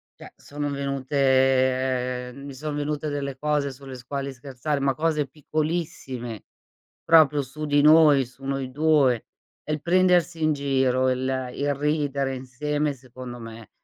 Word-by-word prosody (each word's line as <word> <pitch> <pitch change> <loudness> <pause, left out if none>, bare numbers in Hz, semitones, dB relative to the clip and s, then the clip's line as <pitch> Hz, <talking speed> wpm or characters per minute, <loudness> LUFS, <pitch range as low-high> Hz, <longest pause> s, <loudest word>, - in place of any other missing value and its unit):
cioè, - - -12
sono 145 0 -5
venute 130 -2 +1
mi 140 0 -9
son 150 +2 -5
venute 150 +1 -2
delle 140 -2 -3
cose 145 -1 0
sulle 135 0 -10
s 125 -1 -12
quali 140 0 -4
scherzare, 135 +3 -3
ma 135 0 +1
cose 155 -2 0
piccolissime, 150 - -4 0.6
proprio 155 -3 +5
su 145 +4 -7
di 145 0 +3
noi, 150 -3 +6
su 130 +2 -17
noi 135 -1 -2
2, 140 -5 +3 0.4
e - - 0
il 150 -1 -3
prendersi 175 -2 +3
in 155 - +3
giro, 130 -2 +1
il 130 0 -2
il 145 0 0
ridere 140 -2 -1
insieme, 145 +3 -2
secondo 125 -1 -10
me, 115 -1 -10
140 Hz, 145 wpm, -25 LUFS, 130-150 Hz, 0.6 s, noi